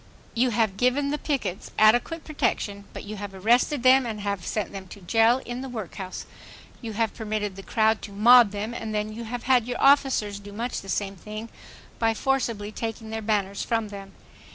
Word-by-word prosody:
You 250 Hz, +2 st, +2 dB
have 220 Hz, -4 st, 0 dB
given 270 Hz, +4 st, +2 dB
the 295 Hz, -, -2 dB
pickets 265 Hz, -, -3 dB
adequate 240 Hz, +10 st, +4 dB
protection; 205 Hz, -9 st, -2 dB
but -, -, -8 dB
you 210 Hz, +1 st, -7 dB
have 200 Hz, -1 st, -7 dB
arrested 240 Hz, +7 st, +2 dB
them 260 Hz, +1 st, +6 dB
and 215 Hz, -2 st, -4 dB
had 200 Hz, -1 st, -2 dB
them 170 Hz, -, -12 dB, 0.3 s
sent 190 Hz, -2 st, -8 dB
to 200 Hz, -, -11 dB
jail 225 Hz, +7 st, +3 dB
and 245 Hz, +2 st, -5 dB
the 265 Hz, -, -6 dB
workhouse; 195 Hz, -5 st, -6 dB, 0.6 s
you 225 Hz, -3 st, -5 dB
have 225 Hz, 0 st, 0 dB
permitted 210 Hz, -3 st, -3 dB
the 195 Hz, -, -8 dB
crowd 220 Hz, +2 st, +1 dB
to 205 Hz, -, -8 dB
mob 235 Hz, +3 st, +7 dB
them, 210 Hz, +3 st, -4 dB
and 220 Hz, -2 st, -4 dB
then 210 Hz, 0 st, -2 dB
you 230 Hz, +1 st, -6 dB
have 240 Hz, +1 st, -5 dB
had 250 Hz, -3 st, +3 dB
your 245 Hz, -, -3 dB
officers 265 Hz, -7 st, +3 dB
do 205 Hz, 0 st, -11 dB
much 235 Hz, +4 st, -3 dB
the 195 Hz, -, -11 dB
same 195 Hz, +1 st, -2 dB
thing 215 Hz, +4 st, -8 dB, 0.5 s
by 225 Hz, -1 st, +2 dB
forcibly 230 Hz, -5 st, -1 dB
taking 225 Hz, 0 st, -5 dB
their 220 Hz, 0 st, -3 dB
banners 200 Hz, -2 st, -1 dB
from 225 Hz, -2 st, -1 dB
them. 195 Hz, -1 st, -9 dB
220 Hz, 200 wpm, -25 LUFS, 205-245 Hz, 0.6 s, mob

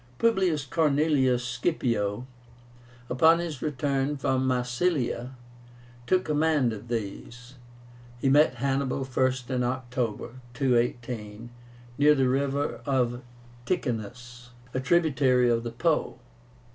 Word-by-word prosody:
Publius 190 Hz, -10 st, +1 dB
Cornelius 140 Hz, -4 st, +2 dB
Scipio, 120 Hz, -4 st, -1 dB, 0.8 s
upon 160 Hz, +7 st, +5 dB
his 165 Hz, -6 st, -5 dB
return 140 Hz, 0 st, -1 dB
from 130 Hz, -1 st, 0 dB
Massilia, 125 Hz, 0 st, -1 dB, 0.7 s
took 185 Hz, 0 st, +2 dB
command 150 Hz, -5 st, +2 dB
of 110 Hz, +2 st, -9 dB
these. 120 Hz, +3 st, -6 dB, 0.7 s
He 135 Hz, -, 0 dB
met 135 Hz, -2 st, +4 dB
Hannibal 135 Hz, +1 st, -1 dB
first 130 Hz, -1 st, -1 dB
in 125 Hz, -1 st, 0 dB
October, 125 Hz, -2 st, -3 dB, 0.2 s
218, 120 Hz, -3 st, -1 dB, 0.5 s
near 150 Hz, +1 st, +6 dB
the 135 Hz, -2 st, +2 dB
river 135 Hz, -2 st, -1 dB, 0.5 s
Ticinus, 125 Hz, -, -4 dB, 0.2 s
a 130 Hz, -, -1 dB
tributary 130 Hz, -4 st, +3 dB
of 115 Hz, 0 st, +1 dB
the 120 Hz, -, -4 dB
Po. 155 Hz, +5 st, 0 dB
130 Hz, 100 wpm, -27 LUFS, 120-145 Hz, 0.8 s, near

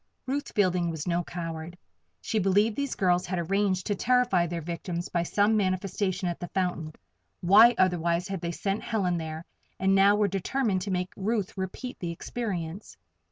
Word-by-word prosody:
Ruth 280 Hz, +2 st, -3 dB
Fielding 180 Hz, -4 st, +2 dB
was 160 Hz, -2 st, -4 dB
no 175 Hz, 0 st, +1 dB
coward. 165 Hz, 0 st, -6 dB, 0.4 s
She 220 Hz, -, -1 dB
believed 205 Hz, +3 st, +3 dB
these 280 Hz, -2 st, -2 dB
girls 180 Hz, -1 st, +2 dB
had 185 Hz, 0 st, -2 dB
arranged 185 Hz, +1 st, 0 dB
to 205 Hz, -, 0 dB
terrify 240 Hz, -5 st, +2 dB
their 170 Hz, 0 st, -3 dB
victims 170 Hz, +1 st, -4 dB
by 170 Hz, -, 0 dB
some 205 Hz, +5 st, +2 dB
manifestation 185 Hz, -1 st, 0 dB
at 175 Hz, -, -3 dB
the 175 Hz, -, -5 dB
fountain 175 Hz, -5 st, -2 dB, 0.5 s
why, 215 Hz, +7 st, +7 dB
otherwise, 175 Hz, -1 st, +2 dB
had 195 Hz, -3 st, -4 dB
they 170 Hz, -, -2 dB
sent 195 Hz, +4 st, -2 dB
Helen 190 Hz, -7 st, 0 dB
there 160 Hz, +1 st, -6 dB, 0.3 s
and 190 Hz, +1 st, +3 dB
now 195 Hz, +1 st, +6 dB
were 210 Hz, -1 st, +2 dB
determined 195 Hz, +1 st, 0 dB
to 200 Hz, -, -4 dB
make 180 Hz, 0 st, -2 dB
Ruth 205 Hz, 0 st, -2 dB
repeat 195 Hz, +7 st, -5 dB
the 175 Hz, -, -3 dB
experience? 180 Hz, -1 st, -5 dB
185 Hz, 170 wpm, -27 LUFS, 175-205 Hz, 0.5 s, why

